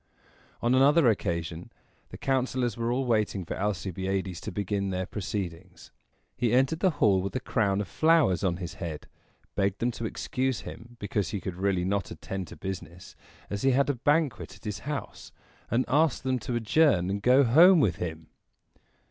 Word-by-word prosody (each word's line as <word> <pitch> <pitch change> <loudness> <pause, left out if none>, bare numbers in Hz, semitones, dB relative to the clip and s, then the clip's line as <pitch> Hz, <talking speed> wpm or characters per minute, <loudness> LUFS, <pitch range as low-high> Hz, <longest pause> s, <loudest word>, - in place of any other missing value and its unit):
On 120 +1 +3
another 140 +3 +5
occasion 85 -5 -2 0.4
the - - -9
councilors 130 -3 0
were 115 0 -1
all 130 +2 0
waiting 105 -5 0
for - - -4
Alcibiades 95 -2 -2
to - - -5
begin 100 +1 -2
their 95 0 -2
proceedings. 95 -3 -6 0.4
He 120 -2 0
entered 135 +6 +2
the 190 - +3
hall 95 -3 +4
with 100 +5 -5
a - - +1
crown 100 -5 0
of 100 - -5
flowers 155 - +3
on 90 -3 +1
his 90 -2 -6
head; 80 -4 -6 0.5
begged 100 0 0
them 120 +1 0
to 115 - -6
excuse 130 +2 -2
him, 120 +1 -10
because 100 -2 -2
he 100 - -3
could 95 0 -5
really 95 -1 0
not 100 +1 -1
attend 95 -2 -6
to - - -10
business, 95 -2 -7 0.3
as 100 0 -4
he 135 -1 +3
had 140 +2 +3
a - - -3
banquet 145 0 0
at - - -20
his 105 -2 -4
house; 145 -2 -6 0.4
and 120 +3 +1
asked 150 -1 +2
them 130 -1 0
to 120 +2 -4
adjourn 110 - +3
and 100 +1 -2
go 130 +5 +5
home 165 +9 +7
with 90 - +2
him. 80 -2 -5
105 Hz, 180 wpm, -28 LUFS, 95-130 Hz, 0.5 s, home